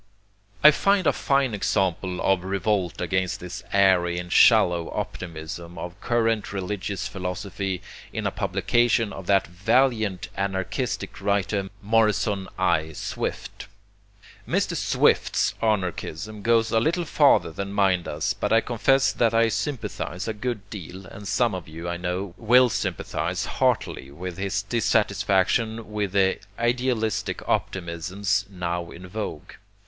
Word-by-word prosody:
I 150 - +11
find 195 +4 +2
a - - +4
fine 135 -3 +1
example 95 -2 0
of 95 -2 +2
revolt 95 -1 -1
against 95 0 -1
the 90 -1 -8 0.2
airy 95 -3 +3
and 90 0 -5
shallow 85 -2 +5
optimism 85 0 -6
of 90 +4 -7
current 115 -4 0
religious 100 0 -3
philosophy 95 0 -4 0.3
in - - -4
a - - +1
publication 120 -2 +1
of 95 -2 -8
that 100 -1 +4
valiant 105 +1 +1
anarchistic 100 +5 -3
writer 100 0 0
Morrison 105 -2 +2
I. 80 0 +1
Swift. - - -5 0.8
Mr. - - +1
Swift's - - +2
anarchism 105 0 -2
goes 115 +1 +2
a 115 - +4
little 170 +7 0
farther 145 - +4
than 100 +4 -5
mine 95 -3 +2
does, 75 -2 -2
but - - -3
I 115 - +6
confess 130 +4 +2
that 115 -1 +2
I 115 0 +4
sympathize 110 - -3
a 110 - -1
good 110 -2 -4
deal, 95 -1 -8
and 100 +2 -10
some 110 +2 +2
of 90 -4 -6
you, 80 +2 -7
I 85 0 -2
know, 90 +1 -3
will 125 +2 +5
sympathize 95 -3 -2
heartily 65 - 0
with 90 +5 -7
his 100 0 -1
dissatisfaction 105 +1 +1
with 105 -2 -2
the 95 -1 +3 0.2
idealistic 120 -2 -1
optimisms 95 +3 -1
now 85 -2 -3
in 90 +2 -10
vogue. 95 -6 -5
100 Hz, 135 wpm, -25 LUFS, 90-110 Hz, 0.8 s, I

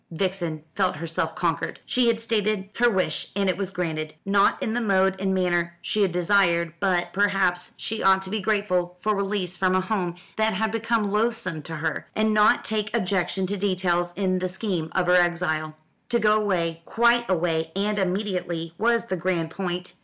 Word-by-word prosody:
Vixen 170 -3 -2
felt 190 -2 +1
herself 160 0 -3
conquered. 165 -4 -1
She 250 -1 +2
had 230 -1 +2
stated 210 -3 -1
her 240 0 +4
wish, 190 -5 -1
and 200 -1 +1
it 185 - +2
was 195 -1 -3
granted; 160 -5 -3
not 200 0 +3
in 220 - -1
the 245 - 0
mode 190 -3 +2
and 190 0 0
manner 175 -2 0
she 210 - -1
had 195 -3 +3
desired; 175 -2 +2
but 180 -2 0
perhaps 195 -3 +1
she 220 0 -3
ought 190 0 +4
to 190 - -7
be 215 -1 -1
grateful 185 -4 0
for 215 +3 +1
release 195 -2 -2
from 185 +1 +1
a - - +4
home 185 -3 -2 0.2
that 220 0 +2
had 220 0 0
become 225 -2 0
loathsome 220 -6 0
to 165 +2 -7
her, 160 0 -3
and 215 0 +2
not 210 0 +4
take 215 +1 -1
objection 190 -1 0
to 200 +2 -2
details 180 -3 0
in 185 -1 0
the 185 0 -2
scheme 180 -4 -3
of 185 - +1
her 180 - +3
exile. 170 -3 +1 0.3
To 240 - +3
go 215 -2 +3
away, 170 -5 -1
quite 235 0 +2
away, 165 -3 0
and 205 +1 0
immediately, 180 -4 -2
was 235 +1 +2
the 190 -5 -3
grand 170 -2 -1
point. 180 -1 -4
190 Hz, 190 wpm, -25 LUFS, 175-210 Hz, 0.3 s, her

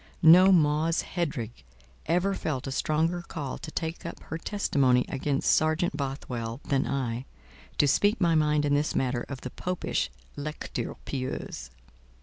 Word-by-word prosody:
No 180 +4 +9
Mause 160 -1 +3
Headrigg 140 - -4 0.4
ever 180 +5 +2
felt 145 -8 -3
a 135 - -4
stronger 160 +5 0
call 150 -5 -5
to - - -7
take 160 +1 -4
up 170 - -6
her 160 - -5
testimony 135 -11 +2
against 135 0 0
Sergeant 155 +1 +2
Bothwell, 130 -4 -4
than 135 -1 0
I—to 115 - -3
speak 205 - +3
my 170 -3 +3
mind 150 -1 +3
in 145 - +2
this 145 +1 +1
matter 125 -2 0
of 140 -2 -6
the 125 - -6
popish 180 0 -2 0.3
"lecture 150 +2 -4
pieuse." 130 - -4
150 Hz, 140 wpm, -28 LUFS, 130-165 Hz, 0.4 s, No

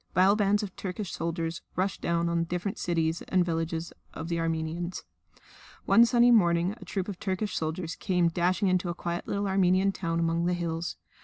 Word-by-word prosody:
Vile 190 +3 +5
bands 205 0 +2
of 195 -3 -6
Turkish 190 0 -5
soldiers 165 0 -3
rushed 190 +2 -1
down 170 0 0
on 170 0 +1
the 165 - 0
different 180 +5 -3
cities 165 -1 0
and 185 -2 +2
villages 165 0 -2 0.2
of 160 +1 -5
the 170 -1 -1
Armenians. 165 +2 -2 0.8
One 235 +1 +6
sunny 240 0 +5
morning 175 -4 +4
a - - -9
troop 190 -2 -3
of 200 -4 -6
Turkish 200 0 -2
soldiers 160 +1 -3
came 180 -3 +1
dashing 180 +4 +1
into 185 -1 +1
a 170 - -3
quiet 170 -1 -4
little 200 0 -1
Armenian 190 0 +3
town 165 -3 -2
among 165 0 +1
the 180 - +1
hills. 165 -1 -3
175 Hz, 185 wpm, -28 LUFS, 165-195 Hz, 0.8 s, One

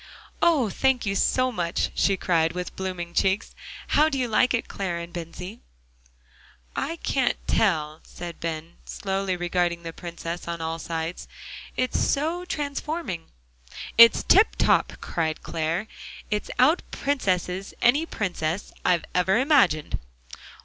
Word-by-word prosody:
"Oh! 310 -9 +4
thank 265 0 +1
you 195 - 0
so 255 +5 +2
much," 175 -6 -1
she 195 -1 +2
cried, 165 -3 +1
with 180 0 -5
blooming 180 -2 -4
cheeks. 190 +3 +1 0.4
"How 305 +2 +4
do 280 - -2
you 255 -2 0
like 245 +3 +3
it, 245 - 0
Clare 185 -4 -3
and 170 0 -7
Bensie?" 180 +5 -7 1.2
"I 325 +4 -2
can't 270 -6 0
tell," 155 -7 +1
said 170 -1 -8
Ben, 165 0 -5
slowly 195 -1 -2
regarding 175 -1 0
the 165 0 -6
Princess 170 0 -6
on 170 0 -3
all 165 0 -3
sides; 165 +1 -4 0.5
"it's 255 0 +1
so 325 +5 0
transforming." 285 - -3 0.7
"It's 230 0 +8
tiptop!" 415 +4 +4
cried 160 -2 -2
Clare. 165 +4 -1 0.5
"It 210 0 -1
out 295 +8 +5
princesses 190 -8 -1
any 285 +7 +3
princess 175 - -3
I've 175 -2 +2
ever 180 +3 +3
imagined." 250 - +3
185 Hz, 130 wpm, -25 LUFS, 170-255 Hz, 1.2 s, It's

